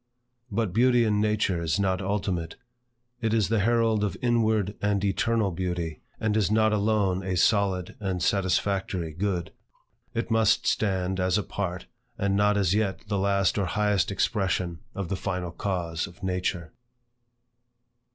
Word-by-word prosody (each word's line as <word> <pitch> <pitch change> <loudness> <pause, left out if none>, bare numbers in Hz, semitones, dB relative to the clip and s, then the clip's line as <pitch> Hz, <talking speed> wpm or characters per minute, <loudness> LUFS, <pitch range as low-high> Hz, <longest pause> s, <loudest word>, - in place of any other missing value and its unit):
But 105 -3 -1
beauty 120 +2 +4
in 105 -2 +2
nature 105 -5 +1
is 80 +3 0
not 95 -1 +1
ultimate. 95 -4 -2 0.7
It 115 -1 +1
is 105 -4 +2
the 115 -1 +2
herald 115 0 +2
of 100 -4 -2
inward 110 -4 +1
and 100 -1 +1
eternal 105 +1 +1
beauty, 85 -2 -3 0.2
and 110 -1 0
is 105 -4 +2
not 110 0 +3
alone 100 -3 +1
a 95 -1 -2
solid 95 -2 +2
and 95 -3 -2
satisfactory 95 -3 0
good. 90 0 -2 0.6
It 115 0 -2
must 110 -2 +3
stand 95 -2 0
as 90 +2 +2
a 105 - 0
part, 90 -3 -4 0.3
and 100 -2 0
not 105 +1 +3
as 95 -3 +2
yet 105 -2 0
the 100 -2 0
last 100 0 +2
or 100 - +1
highest 105 +2 +1
expression 95 -4 0 0.2
of 100 -3 -4
the 95 - 0
final 90 -2 -3
cause 85 -3 -2
of 85 - -15
Nature. 90 -3 -2
100 Hz, 150 wpm, -26 LUFS, 90-105 Hz, 0.7 s, beauty